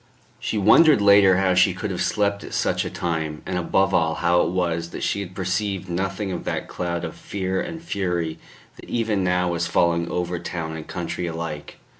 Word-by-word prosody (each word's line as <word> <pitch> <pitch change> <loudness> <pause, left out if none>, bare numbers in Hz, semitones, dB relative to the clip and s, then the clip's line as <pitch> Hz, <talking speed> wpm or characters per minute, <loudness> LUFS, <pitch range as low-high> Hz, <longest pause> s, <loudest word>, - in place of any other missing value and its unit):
She 110 - -2
wondered 145 +10 +6
later 100 -2 +6
how 95 -1 +2
she 90 0 +4
could 100 +2 -4
have 90 - -3
slept 100 -1 0
at - - -6
such - - +1
a - - -4
time, 80 -3 -3
and 95 - -3
above 95 +2 +1
all, 80 -2 +2
how 90 0 +3
it - - +1
was 85 -2 -1
that - - -6
she - - 0
had 95 -2 -7
perceived 95 0 -2
nothing 95 +2 -2
of 90 - -4
that - - -3
cloud 85 -1 -3
of 80 - -6
fear 95 -1 -3
and 170 -2 -5
fury 90 - -2 0.4
that - - -13
even 110 -4 0
now 90 -1 +1
was 85 0 -1
falling 85 0 +1
over 90 0 -2
town 80 -2 -5
and 80 -1 -8
country 90 0 -4
alike. 80 -2 -6
90 Hz, 200 wpm, -23 LUFS, 85-100 Hz, 0.4 s, wondered